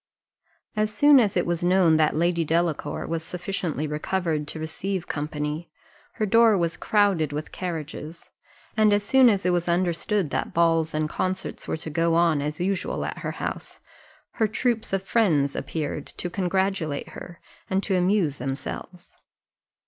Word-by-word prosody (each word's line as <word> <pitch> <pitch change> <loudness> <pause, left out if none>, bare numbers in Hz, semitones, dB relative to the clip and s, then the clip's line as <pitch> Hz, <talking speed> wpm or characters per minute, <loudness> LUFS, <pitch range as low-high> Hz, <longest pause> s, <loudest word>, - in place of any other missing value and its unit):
As 215 0 +1
soon 290 +3 +6
as 210 -6 +2
it 175 - +2
was 170 0 -1
known 175 -3 +4
that 155 -1 +2
Lady 170 +1 +1
Delacour 165 0 -1
was 165 0 -2
sufficiently 175 -3 -3
recovered 155 0 -2
to 160 - -6
receive 175 +3 -3
company, 150 +2 -3 0.4
her 215 - -1
door 225 0 +5
was 170 -2 0
crowded 195 -7 +2
with 150 +1 -5
carriages; 165 -2 -6 0.4
and 215 -2 +4
as 205 0 +2
soon 260 +3 +6
as 200 -3 0
it 180 - +3
was 175 0 0
understood 175 +1 0
that - - -2
balls 165 -2 +2
and 155 0 0
concerts 185 +4 -3
were - - -2
to 160 0 -7
go 165 +1 +2
on 165 -3 +3
as 150 +1 -3
usual 190 +1 -1
at - - -5
her - - -4
house, - - -5 0.5
her 220 - +1
"troops 225 +1 -1
of 195 0 0
friends" 170 -10 +2
appeared 150 -2 -4
to 175 - -6
congratulate 190 -5 -1
her, 175 -1 -10 0.3
and 195 +1 0
to 195 - 0
amuse 180 -5 +2
themselves. 135 +7 -6
175 Hz, 160 wpm, -25 LUFS, 155-195 Hz, 0.5 s, soon